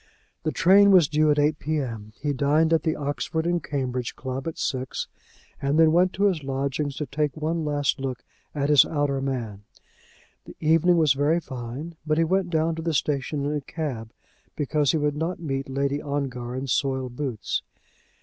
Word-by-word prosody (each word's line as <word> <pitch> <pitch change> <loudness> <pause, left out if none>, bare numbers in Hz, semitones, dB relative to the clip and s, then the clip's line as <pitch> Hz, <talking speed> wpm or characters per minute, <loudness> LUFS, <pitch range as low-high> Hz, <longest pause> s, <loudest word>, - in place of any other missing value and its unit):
The 155 - -1
train 200 +5 +6
was 180 -6 +6
due 155 +1 +2
at 150 - +3
8 150 +1 +2
P.M. 120 -9 -3
He 145 -1 -1
dined 150 +4 +2
at 160 - +3
the 160 0 0
Oxford 145 +3 -2
and 175 -2 0
Cambridge 130 -3 -3
Club 130 +2 -5
at 165 - -4
six, 130 -1 -3 0.5
and 140 +2 +1
then 160 -1 +6
went 180 +3 +4
to 200 - -1
his 190 -6 +2
lodgings 140 +1 -2
to 150 - -3
take 145 +1 -2
one 160 +2 -1
last 145 -1 0
look 130 -2 -4 0.3
at 145 0 0
his 145 - +8
outer 145 -3 -1
man. 120 -7 -3 0.8
The - - -11
evening 165 +2 +4
was 155 -5 +4
very 145 +5 +2
fine, 130 +4 -7
but 155 0 0
he 165 - +4
went 185 +2 +1
down 160 0 +1
to - - -3
the 165 -1 -1
station 140 0 -1
in 145 - -1
a 145 - -2
cab, 130 -7 -5 0.4
because 145 -1 +1
he - - +1
would 150 -1 0
not 165 +4 -2
meet 135 -4 -3
Lady 140 +2 -1
Ongar 130 -4 -3
in 130 +1 -3
soiled 130 -1 -1
boots. 130 -6 -2
145 Hz, 190 wpm, -25 LUFS, 135-160 Hz, 0.8 s, his